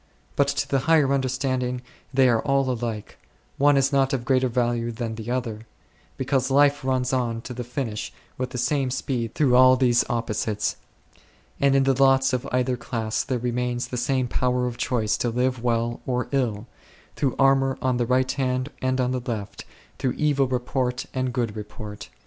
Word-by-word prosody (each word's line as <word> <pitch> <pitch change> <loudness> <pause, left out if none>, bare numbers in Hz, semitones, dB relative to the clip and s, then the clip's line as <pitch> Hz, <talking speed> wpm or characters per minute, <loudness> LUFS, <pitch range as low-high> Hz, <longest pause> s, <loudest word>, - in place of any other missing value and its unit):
But 140 - +3
to 140 0 -1
the 135 - +1
higher 150 -4 +4
understanding 130 -1 -1 0.3
they 130 -1 +4
are 115 -2 +3
all 135 -1 +1
alike; 115 -3 -5 0.4
one 145 0 +5
is 135 +1 +2
not 135 0 +2
of 125 -3 -2
greater 130 +1 +3
value 120 -1 0
than 115 -1 -4
the 110 +1 -7
other; 115 -3 -3 0.5
be 130 - -3
cause 130 -1 +1
life 145 +1 +4
runs 130 -1 0
on 120 -3 -1
to 125 - -7
the 125 0 -5
finish 120 -3 -4 0.2
with 130 0 -3
the 125 - -6
same 135 +1 0
speed 125 -2 -3
through 135 -5 +3
all 130 0 +7
these 125 -2 +3
opposites, 110 -2 -1 0.8
and 140 -1 +3
in 135 - +4
the 135 0 +3
lots 135 0 +4
of 125 - -1
either 125 0 +1
class 115 -2 -2
there 130 -3 -2
remains 120 0 -2
the - - -4
same 130 +1 0
power 125 +1 0
of 120 -1 -3
choice 120 -3 0
to 120 - 0
live 125 +1 0
well 120 0 0
or 125 -1 -1
ill, 115 -6 -1 0.3
" - - -28
through 135 -3 0
armour 135 -1 +3
on 130 -1 0
the 120 -1 0
right 130 +1 +2
hand 130 0 -1
and 130 0 0
on 125 0 +1
the 130 -1 -2
left, 105 -4 -5 0.3
through 130 - 0
evil 145 -3 +1
report 125 0 -1
and 130 -1 -1
good 120 -4 -1
report6." 105 0 -8
125 Hz, 190 wpm, -24 LUFS, 120-135 Hz, 0.8 s, all